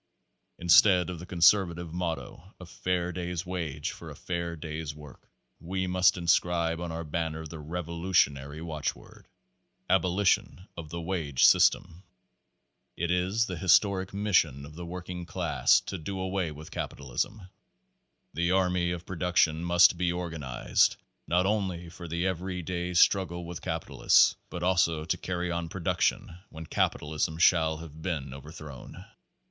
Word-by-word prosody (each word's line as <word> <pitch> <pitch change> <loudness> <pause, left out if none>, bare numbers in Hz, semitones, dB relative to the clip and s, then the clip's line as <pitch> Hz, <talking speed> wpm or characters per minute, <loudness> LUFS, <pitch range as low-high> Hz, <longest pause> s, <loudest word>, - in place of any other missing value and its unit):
Instead 90 +1 +5
of 85 - -7
the 90 - -9
conservative 85 -1 +3
motto, 85 +1 -5
"A 90 - -9
fair 90 0 -2
day's 90 -1 -4
age 80 -5 -3
for - - -10
a - - -9
fair 85 -1 -4
day's 75 -1 -6
work," 75 -3 -14 0.3
we 95 +3 -3
must 90 0 +3
inscribe 85 -1 +1
on 85 -1 -4
our 80 +1 -4
banner 80 0 -3
the 80 +1 -8
revolutionary 80 -3 -1
watchword, 75 -3 -5 0.6
"Abolition 95 +1 +1
of 80 -2 -8
the 85 +2 -5
wage 80 -6 +1
system." 85 +2 +4 1.0
It 85 +1 -1
is 95 +5 +1
the 90 -5 -5
historic 95 +2 +3
mission 90 -9 +1
of 75 - -12
the 85 +2 -8
working 90 0 -7
class - - +2
to 95 - -6
do 95 +4 -5
away 95 -3 -2
with 75 +1 -11
capitalism. 95 - -4 0.8
The 85 +1 0
army 90 -2 +1
of 90 0 -7
production 85 -3 +1
must 85 0 +5
be 90 -1 +1
organized, 80 -8 0 0.3
not 90 +2 +2
only 95 -5 -1
Tor 85 -1 -9
the 85 +2 -2
every 90 0 -3
day 90 +1 -3
strug 95 +2 +4
gle 85 +1 -7
with 85 0 -7
capitalists, - - +3
but 90 -1 -6
also 85 -4 +2
to 80 - -1
carry 90 -1 -3
on 85 -1 -3
production 85 -1 -1
when 80 +1 -9
capitalism 80 +1 -1
shall 80 -2 +4
have 80 -1 -11
been 75 -7 -3
overthrown. 70 -1 -10
85 Hz, 145 wpm, -28 LUFS, 80-90 Hz, 1.0 s, Instead